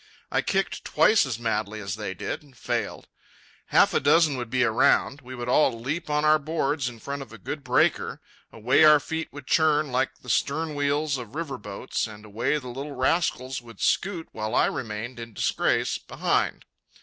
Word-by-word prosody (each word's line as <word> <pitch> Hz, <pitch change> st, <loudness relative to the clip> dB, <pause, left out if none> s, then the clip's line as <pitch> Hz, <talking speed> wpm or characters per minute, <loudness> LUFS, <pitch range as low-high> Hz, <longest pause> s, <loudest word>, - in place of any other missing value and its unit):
I -, -, +2 dB
kicked -, -, -1 dB
twice 215 Hz, -9 st, +4 dB
as 120 Hz, -4 st, -3 dB
madly 110 Hz, -2 st, -2 dB
as 100 Hz, -2 st, -4 dB
they 105 Hz, -3 st, -5 dB
did, -, -, -4 dB
and 140 Hz, -4 st, -21 dB
failed. -, -, -3 dB, 0.6 s
Half -, -, +4 dB
a -, -, +3 dB
dozen 150 Hz, +1 st, +4 dB
would 120 Hz, -3 st, -5 dB
be 130 Hz, +2 st, +2 dB
around. 125 Hz, +4 st, +3 dB
We 130 Hz, 0 st, -9 dB
would 120 Hz, -1 st, -5 dB
all 125 Hz, -2 st, +3 dB
leap 150 Hz, +8 st, -3 dB
on 150 Hz, 0 st, +1 dB
our 155 Hz, 0 st, +5 dB
boards 145 Hz, -3 st, -1 dB
in 120 Hz, -, -11 dB
front 140 Hz, +5 st, -5 dB
of 135 Hz, -, -10 dB
a 115 Hz, -, -10 dB
good 140 Hz, +7 st, -6 dB
breaker. 125 Hz, -1 st, +1 dB, 0.3 s
Away 115 Hz, +6 st, +3 dB
our 150 Hz, -1 st, +8 dB
feet 160 Hz, +2 st, -4 dB
would 145 Hz, -1 st, -10 dB
churn 155 Hz, -2 st, +2 dB
like 130 Hz, +1 st, -1 dB
the -, -, -15 dB
stern 155 Hz, +2 st, 0 dB
wheels 145 Hz, 0 st, 0 dB
of 120 Hz, +1 st, -9 dB
river 155 Hz, -5 st, -3 dB
steamboats, 105 Hz, +2 st, -3 dB
and 105 Hz, 0 st, -11 dB
away 115 Hz, +8 st, 0 dB
the 130 Hz, -4 st, -7 dB
little 140 Hz, +4 st, -6 dB
rascals 130 Hz, -3 st, 0 dB
would 115 Hz, -4 st, -14 dB
scoot 185 Hz, -4 st, 0 dB
while 110 Hz, +1 st, -3 dB
I -, -, +5 dB
remained 120 Hz, -1 st, -4 dB
in 115 Hz, -1 st, -8 dB
disgrace -, -, 0 dB
behind. -, -, -1 dB
130 Hz, 190 wpm, -26 LUFS, 115-150 Hz, 0.6 s, our